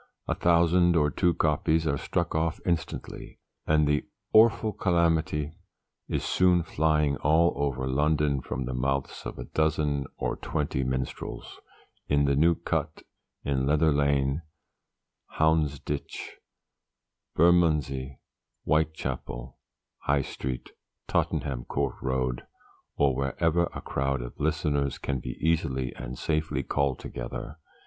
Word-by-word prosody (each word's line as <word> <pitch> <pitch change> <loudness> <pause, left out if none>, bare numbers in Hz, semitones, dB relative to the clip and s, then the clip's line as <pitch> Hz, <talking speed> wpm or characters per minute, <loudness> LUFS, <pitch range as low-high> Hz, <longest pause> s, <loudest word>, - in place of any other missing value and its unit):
A - - +1
thousand 85 +1 +4
or 75 -2 +3
two 85 +5 +2
copies 80 0 +1
are 70 -3 +1
struck 85 -2 -1
off 80 +1 0
instantly, 85 -2 -3 0.3
and 75 -1 +4
the 75 0 +2 0.3
'Orfle 110 -1 +5
Calamity' 85 -3 +1 0.6
is - - -1
soon 90 -2 +3
flying 75 -3 +1
all 80 +3 +3
over 70 -2 -1
London 75 0 +1
from 65 +1 -4
the 65 - -4
mouths 70 +2 -1
of - - -7
a - - -5
dozen 75 -3 0
or - - -2
twenty 70 -3 -2
minstrels, 65 0 -4 0.5
in 70 0 +3
the 70 0 +2
New 85 +4 +4
Cut, 80 -2 -3 0.4
in 65 -1 0
Leather 75 +2 +4
Lane, 70 0 +1 1.0
Houndsditch, 75 -3 0 1.0
Bermondsey, 75 -6 +3 0.5
Whitechapel, 75 -5 -2 0.4
High 70 -1 +1
Street, 65 -1 -5 0.4
Tottenham 65 -4 -1
court 70 -1 -2
road 65 -2 -1 0.5
or 70 -3 +3
wherever 80 +6 +1
a - - -7
crowd 70 -2 -1
of - - -9
listeners 75 -3 0
can 70 -2 -2
be 60 +1 -6
easily 75 -6 0
and 65 0 -7
safely 75 -3 -1
called 70 0 0
together. - - -6
75 Hz, 120 wpm, -27 LUFS, 70-80 Hz, 1.0 s, Orfle